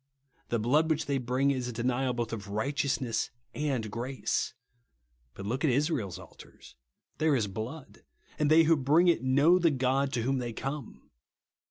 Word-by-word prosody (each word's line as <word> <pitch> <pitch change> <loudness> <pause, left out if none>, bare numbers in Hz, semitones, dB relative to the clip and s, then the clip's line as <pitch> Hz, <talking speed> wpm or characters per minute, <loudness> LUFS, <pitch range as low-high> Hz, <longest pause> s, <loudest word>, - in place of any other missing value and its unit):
The 120 - +1
blood 145 +9 +2
which 160 -1 0
they 140 -1 0
bring 130 +3 +1
is 130 -3 -2
a - - -3
denial 125 +2 0
both 120 -1 -3
of 100 -3 -6
righteousness 130 +2 -1 0.2
and 135 -8 -2
grace. 120 +2 -2 0.8
But 100 - -7
look 125 +6 -2
at 155 - +4
Israel's 130 - 0
altars. 65 - -15 0.4
There 155 -2 +3
is 115 -5 +1
blood; 115 +9 -7 0.4
and 150 -1 +2
they 160 +1 +7
who 165 +1 +4
bring 155 +6 +4
it 170 - +2
know 140 +7 +4
the 170 -2 +4
God 135 0 +1
to 120 -2 0
whom 135 +2 0
they 120 -2 -4
come. 135 +2 -6
130 Hz, 170 wpm, -29 LUFS, 120-145 Hz, 0.8 s, they